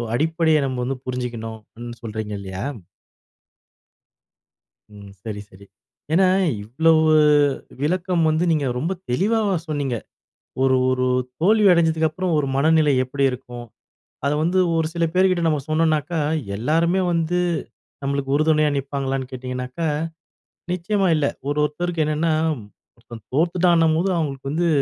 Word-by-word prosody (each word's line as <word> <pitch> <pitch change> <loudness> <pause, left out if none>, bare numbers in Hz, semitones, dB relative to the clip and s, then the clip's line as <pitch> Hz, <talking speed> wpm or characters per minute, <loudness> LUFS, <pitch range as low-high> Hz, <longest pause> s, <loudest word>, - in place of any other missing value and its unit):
அடிப்படைய 160 +2 +2
நம்ப 130 -1 -3
வந்து 135 0 -2
புரிஞ்சுக்கணும்னு" 115 -3 -5 0.2
இந் 120 -1 -9
சொல்றீங்க 110 -1 -5
இல்லையா? 95 -1 -6 2.3
ம். 100 -1 -12
செரி 105 -2 -5
செரி. 95 +2 -16 0.5
ஏன்னா, 185 +3 +5 0.4
இவ்ளோவு 155 +7 +3 0.7
விளக்கம் 175 +2 0
வந்து 155 +2 +1
நீங்க 150 -4 +1
ரொம்ப 160 +8 -2 0.2
தெளிவா 205 - +1
சொன்னீங்க. 145 -5 -2 0.7
ஒரு 130 -1 +4
ஒரு 130 0 +1 0.4
தோல்வி 210 +3 +4
அடைஞ்சதுக்கப்பறம் 160 +1 +1
ஒரு 145 - 0
மனநிலை 155 +1 +4
எப்படி 135 +2 -1
இருக்கும். 120 -1 -8 0.6
அத 140 - +2
வந்து 180 +3 +2 0.2
ஒரு 160 -1 +1
சில 170 -1 +1
பேர்கிட்ட 185 -1 +3
நம்ம 150 -3 +1
சொன்னோம்னாக்கா 155 0 +1 0.4
எல்லோருமே 165 - +1
வந்து, 170 +1 0 0.6
நம்மளுக்கு 140 0 -1
உறுதுணையா 155 0 +3
நிப்பாங்களான்னு 135 -1 -3
கேட்டீங்கன்னாக்கா, 125 +4 -4 0.9
நிச்சயமா 190 +1 0
இல்ல. 150 -2 +1 0.2
ஒரு 145 +1 -1
ஒருத்தருக்கு 165 +2 -2
என்னென்னா 155 +2 0 0.6
ஒருத்தன் 115 -2 -12
தோத்துட்டான்னும்போது 170 +1 +3
அவுங்களுக்கு 135 -4 -3
வந்து, 170 +3 +1
155 Hz, 115 wpm, -22 LUFS, 130-170 Hz, 2.3 s, ஏன்னா